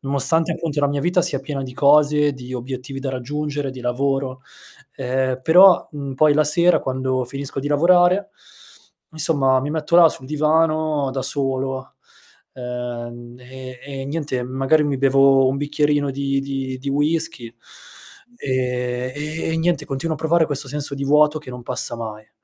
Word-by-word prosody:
nonostante, 140 Hz, +5 st, +1 dB
appunto, 155 Hz, -3 st, -3 dB
la 145 Hz, -, +2 dB
mia 145 Hz, 0 st, -2 dB
vita 175 Hz, +3 st, +1 dB
sia 140 Hz, -, 0 dB
piena 135 Hz, 0 st, -5 dB
di 130 Hz, -1 st, -7 dB
cose, 150 Hz, +1 st, +4 dB
di 130 Hz, -1 st, -10 dB
obiettivi 130 Hz, +2 st, -6 dB
da 135 Hz, -1 st, -3 dB
raggiungere, 145 Hz, +2 st, -4 dB
di 130 Hz, -, -10 dB
lavoro, 130 Hz, +1 st, -2 dB, 0.6 s
ehm, 130 Hz, 0 st, -1 dB
però, 180 Hz, +4 st, +6 dB
mhmm, 140 Hz, -2 st, -6 dB
poi 150 Hz, +2 st, +4 dB
la 155 Hz, -, +4 dB
sera 170 Hz, +4 st, +3 dB
quando 130 Hz, -1 st, -2 dB
finisco 135 Hz, +1 st, -5 dB
di 145 Hz, -, -4 dB
lavorare, 175 Hz, +6 st, +3 dB, 0.8 s
insomma, 140 Hz, -4 st, +3 dB
mi 145 Hz, +3 st, -4 dB
metto 160 Hz, +1 st, -3 dB
là 170 Hz, -2 st, +8 dB
sul 130 Hz, -, -8 dB
divano 155 Hz, -1 st, +1 dB
da 135 Hz, 0 st, -3 dB
solo, 135 Hz, -1 st, -2 dB, 0.6 s
uhm, 120 Hz, -1 st, -7 dB
e 130 Hz, 0 st, -10 dB
e 135 Hz, -1 st, -7 dB
niente, 145 Hz, -4 st, -3 dB
magari, 135 Hz, +5 st, +1 dB
mi 140 Hz, -2 st, -1 dB
bevo 135 Hz, 0 st, +4 dB
un 135 Hz, -, -1 dB
bicchierino 145 Hz, 0 st, 0 dB
di 140 Hz, 0 st, -1 dB
di 135 Hz, -1 st, -4 dB
di 140 Hz, +2 st, -6 dB
whiskey 145 Hz, -5 st, -1 dB, 0.8 s
e 125 Hz, -, -2 dB, 0.4 s
e -, -, -1 dB
niente 170 Hz, +1 st, 0 dB
continuo 140 Hz, +4 st, -3 dB
a -, -, -9 dB
provare 160 Hz, +1 st, +2 dB
questo 140 Hz, -1 st, -1 dB
senso 145 Hz, 0 st, 0 dB
di 140 Hz, -, -6 dB
vuoto 150 Hz, +2 st, +3 dB
che 145 Hz, -, -11 dB
non 125 Hz, -1 st, -9 dB
passa 120 Hz, -, +1 dB
mai. 110 Hz, -2 st, -8 dB
140 Hz, 160 wpm, -20 LUFS, 130-150 Hz, 0.8 s, là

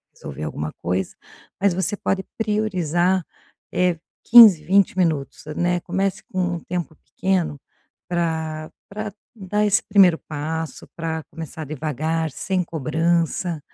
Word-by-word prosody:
resolver 70 Hz, +3 st, -8 dB
alguma 75 Hz, 0 st, -4 dB
coisa. 90 Hz, +1 st, -1 dB, 0.4 s
Mas 200 Hz, -2 st, +3 dB
você 190 Hz, +3 st, -1 dB
pode 190 Hz, 0 st, -1 dB
priorizar, 185 Hz, -5 st, +1 dB, 0.5 s
eh, 180 Hz, -2 st, +2 dB, 0.3 s
15, 220 Hz, -9 st, +9 dB
20 190 Hz, +4 st, +3 dB
minutos, 160 Hz, -6 st, 0 dB
né, 175 Hz, 0 st, +1 dB
comece 190 Hz, +2 st, -1 dB
com 185 Hz, -, -2 dB, 0.2 s
um -, -, -8 dB
tempo 175 Hz, -2 st, -4 dB
pequeno 175 Hz, -7 st, -2 dB, 0.5 s
pra 160 Hz, -2 st, -2 dB, 0.2 s
pra 210 Hz, +1 st, -5 dB, 0.2 s
dar 210 Hz, +1 st, -1 dB
esse 205 Hz, 0 st, +3 dB
primeiro 190 Hz, -5 st, +5 dB
passo, 160 Hz, +2 st, -5 dB
pra 160 Hz, -1 st, -3 dB
começar 160 Hz, 0 st, -7 dB
devagar, 155 Hz, +2 st, -2 dB
sem 185 Hz, +6 st, -1 dB
cobrança. 165 Hz, +2 st, 0 dB
170 Hz, 120 wpm, -22 LUFS, 155-190 Hz, 0.5 s, 15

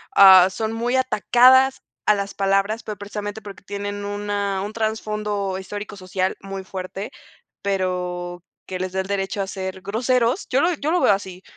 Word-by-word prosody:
ah, 190 Hz, -2 st, +9 dB
son 220 Hz, +4 st, -3 dB
muy 240 Hz, +3 st, -1 dB
atacadas 260 Hz, +2 st, +4 dB, 0.2 s
a 210 Hz, -, +5 dB
las 200 Hz, 0 st, -3 dB
palabras, 195 Hz, +3 st, +1 dB
pero 215 Hz, -2 st, -6 dB
precisamente 205 Hz, +1 st, -6 dB
porque 200 Hz, -2 st, -11 dB
tienen 205 Hz, 0 st, -5 dB
una 205 Hz, -1 st, -2 dB
un 205 Hz, +2 st, -5 dB
trasfondo 210 Hz, -3 st, -2 dB
histórico 205 Hz, +2 st, -7 dB
social 185 Hz, 0 st, -2 dB
muy 195 Hz, 0 st, -6 dB
fuerte, 190 Hz, +2 st, -6 dB, 0.5 s
pero 180 Hz, -2 st, -2 dB, 0.2 s
que 185 Hz, -1 st, -4 dB
les 185 Hz, 0 st, -3 dB
da 190 Hz, -, 0 dB
el 190 Hz, -, -7 dB
derecho 200 Hz, 0 st, -2 dB
a 195 Hz, -, -2 dB
ser 190 Hz, -1 st, -5 dB
groseros 240 Hz, -, 0 dB
yo 265 Hz, +2 st, +2 dB
lo 350 Hz, +1 st, +2 dB
yo 300 Hz, +1 st, -2 dB
lo 355 Hz, 0 st, +2 dB
veo -, -, +5 dB
así, 190 Hz, -2 st, -5 dB
200 Hz, 170 wpm, -22 LUFS, 190-215 Hz, 0.5 s, ah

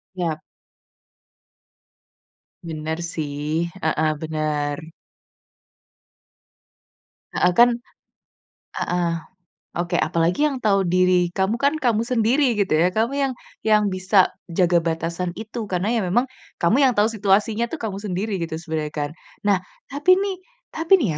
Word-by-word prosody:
Iya. 165 Hz, -4 st, -2 dB, 2.3 s
Bener 160 Hz, +1 st, -3 dB, 0.2 s
sih, 150 Hz, +2 st, -2 dB, 0.2 s
heeh, 155 Hz, 0 st, +1 dB
bener. 150 Hz, -2 st, -1 dB, 2.6 s
Heeh, 180 Hz, -, +3 dB
kan 240 Hz, +1 st, +7 dB, 1.1 s
heeh. 175 Hz, -1 st, 0 dB, 0.7 s
Oke, 175 Hz, 0 st, -2 dB
apalagi 170 Hz, -, +1 dB
yang 270 Hz, -, -4 dB
tahu 200 Hz, -5 st, +2 dB
diri 180 Hz, -1 st, +3 dB
kamu 190 Hz, +4 st, +2 dB
kan 280 Hz, +2 st, +3 dB
kamu 225 Hz, -3 st, +3 dB
sendiri 240 Hz, +1 st, +2 dB
gitu 195 Hz, -6 st, +1 dB
ya, 170 Hz, +4 st, +4 dB
kamu 225 Hz, +7 st, 0 dB
yang 270 Hz, -2 st, +1 dB, 0.3 s
yang 215 Hz, -1 st, +4 dB
bisa 185 Hz, +1 st, +3 dB, 0.2 s
jaga 175 Hz, 0 st, +3 dB
batasan 165 Hz, +2 st, -2 dB
itu 220 Hz, 0 st, -6 dB
karena 190 Hz, +5 st, 0 dB
ya 230 Hz, -, +1 dB
memang 195 Hz, +8 st, +2 dB, 0.3 s
kamu 220 Hz, +12 st, +3 dB
yang -, -, 0 dB
tahu 210 Hz, -, +5 dB
situasinya 215 Hz, +2 st, +1 dB
tuh 330 Hz, -, -4 dB
kamu 205 Hz, -5 st, -4 dB
sendiri 205 Hz, +1 st, -3 dB
gitu 160 Hz, -1 st, -3 dB
sebenarnya 160 Hz, -2 st, -3 dB, 0.2 s
kan. -, -, -5 dB, 0.4 s
Nah, 195 Hz, -3 st, +3 dB, 0.3 s
tapi 345 Hz, +6 st, +4 dB
nih 390 Hz, -1 st, -1 dB, 0.4 s
tapi 330 Hz, +4 st, +4 dB
nih 165 Hz, -, 0 dB
185 Hz, 125 wpm, -22 LUFS, 165-225 Hz, 2.6 s, kan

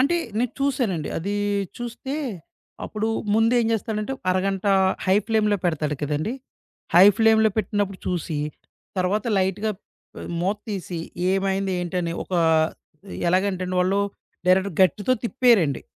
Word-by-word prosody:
అంటే 295 Hz, +7 st, +3 dB, 0.2 s
నేను 245 Hz, +1 st, 0 dB
చూసానండి. 235 Hz, -, 0 dB
అదీ 200 Hz, +5 st, -2 dB, 0.4 s
చూస్తే, 240 Hz, +3 st, -5 dB, 0.7 s
అప్పుడు 215 Hz, +1 st, -2 dB, 0.3 s
ముందేం 230 Hz, +1 st, +3 dB
చేస్తాడంటే, 220 Hz, +2 st, -2 dB, 0.2 s
అరగంట 195 Hz, +1 st, 0 dB, 0.4 s
హై 190 Hz, +1 st, +4 dB
ఫ్లేమ్‌లో 215 Hz, -2 st, +2 dB
పెడతాడు 155 Hz, -3 st, 0 dB
కదండీ! 150 Hz, -, -1 dB, 0.6 s
హై 180 Hz, +3 st, +9 dB
ఫ్లేమ్‌లో 220 Hz, -1 st, +5 dB
పెట్టినప్పుడు 205 Hz, -3 st, -1 dB
చూసి, 170 Hz, -3 st, -2 dB, 0.6 s
తర్వాత 195 Hz, +6 st, 0 dB
లైట్‍గా 195 Hz, +3 st, 0 dB, 0.7 s
మూత్తీసి 195 Hz, -2 st, -3 dB, 0.3 s
ఏమైంది, 195 Hz, 0 st, 0 dB
ఏంటని 175 Hz, -1 st, -2 dB
ఒక -, -, -15 dB, 1.0 s
ఎలాగంటేండి 185 Hz, 0 st, 0 dB
వాళ్ళు, 190 Hz, +2 st, +2 dB, 0.5 s
డైరెక్ట్‌గా 185 Hz, 0 st, +3 dB
గరిటితో 195 Hz, -, +3 dB
తిప్పేరండి. 230 Hz, -, +3 dB
195 Hz, 105 wpm, -23 LUFS, 180-220 Hz, 1.0 s, హై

